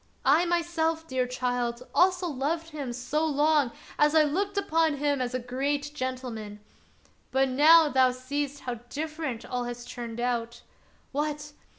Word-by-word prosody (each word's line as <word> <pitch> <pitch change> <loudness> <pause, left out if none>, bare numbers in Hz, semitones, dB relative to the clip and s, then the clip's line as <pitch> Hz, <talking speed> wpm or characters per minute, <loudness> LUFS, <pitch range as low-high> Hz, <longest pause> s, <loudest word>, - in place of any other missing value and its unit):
I 345 - +5
myself, 330 -2 0
dear 255 -2 0
child, 245 -1 -2
also 365 0 +3
loved 320 +2 -2
him 285 -5 -4
so 255 +6 -2
long 295 -3 +2 0.3
as 295 +1 +4
I 315 - +7
looked 390 +7 -1
upon 325 -5 +2
him 285 -1 0
as 250 0 -2
a - - 0
great 280 +4 -2
gentleman. 250 -6 -5 0.7
But 265 0 +2
now 310 +5 +7
thou 260 -2 +4
seest 280 +3 -4
how 245 -2 -4
different 305 -5 -4
all 245 -1 -3
has 240 0 -6
turned 235 -2 -7
out. 235 -1 -2 0.5
What! 295 +1 -3
285 Hz, 150 wpm, -28 LUFS, 250-315 Hz, 0.7 s, I